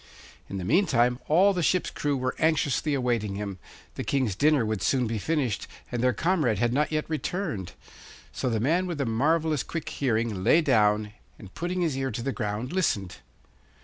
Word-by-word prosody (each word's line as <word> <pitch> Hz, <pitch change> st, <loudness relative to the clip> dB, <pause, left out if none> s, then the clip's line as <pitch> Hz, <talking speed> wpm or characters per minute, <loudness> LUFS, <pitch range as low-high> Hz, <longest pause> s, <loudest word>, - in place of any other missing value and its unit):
In 100 Hz, -, -4 dB
the 95 Hz, -, -4 dB
meantime 125 Hz, -, +3 dB
all 190 Hz, +6 st, +5 dB
the 180 Hz, -, -1 dB
ship's 180 Hz, +2 st, +1 dB
crew 145 Hz, -2 st, -1 dB
were 130 Hz, 0 st, -1 dB
anxiously 150 Hz, -1 st, +1 dB
awaiting 120 Hz, -6 st, -1 dB
him; 100 Hz, -2 st, -5 dB, 0.3 s
the -, -, -5 dB
King's 130 Hz, -7 st, 0 dB
dinner 145 Hz, 0 st, +3 dB
would 110 Hz, -2 st, -2 dB
soon 130 Hz, -2 st, +2 dB
be 110 Hz, -1 st, -2 dB
finished, 135 Hz, -4 st, -1 dB, 0.2 s
and 120 Hz, -2 st, -2 dB
their 125 Hz, -, +4 dB
comrade 150 Hz, -, +1 dB
had 120 Hz, +3 st, +1 dB
not 150 Hz, +4 st, +1 dB
yet 155 Hz, -1 st, 0 dB
returned. 155 Hz, -, -3 dB, 0.6 s
So 130 Hz, -, -2 dB
the 115 Hz, -2 st, 0 dB
man 165 Hz, +10 st, +1 dB
with 170 Hz, -3 st, -3 dB
the 140 Hz, -, -1 dB
marvellous 150 Hz, +6 st, +1 dB
quick 165 Hz, -3 st, -5 dB
hearing 115 Hz, -7 st, -1 dB
lay 165 Hz, -, +5 dB
down 105 Hz, -6 st, +2 dB, 0.2 s
and, 100 Hz, -2 st, -13 dB
putting 180 Hz, +1 st, -2 dB
his 160 Hz, -6 st, 0 dB
ear 135 Hz, 0 st, -1 dB
to 115 Hz, 0 st, -4 dB
the 135 Hz, -, -1 dB
ground, 110 Hz, +4 st, -3 dB
listened. 100 Hz, -, 0 dB
130 Hz, 185 wpm, -27 LUFS, 110-155 Hz, 0.6 s, all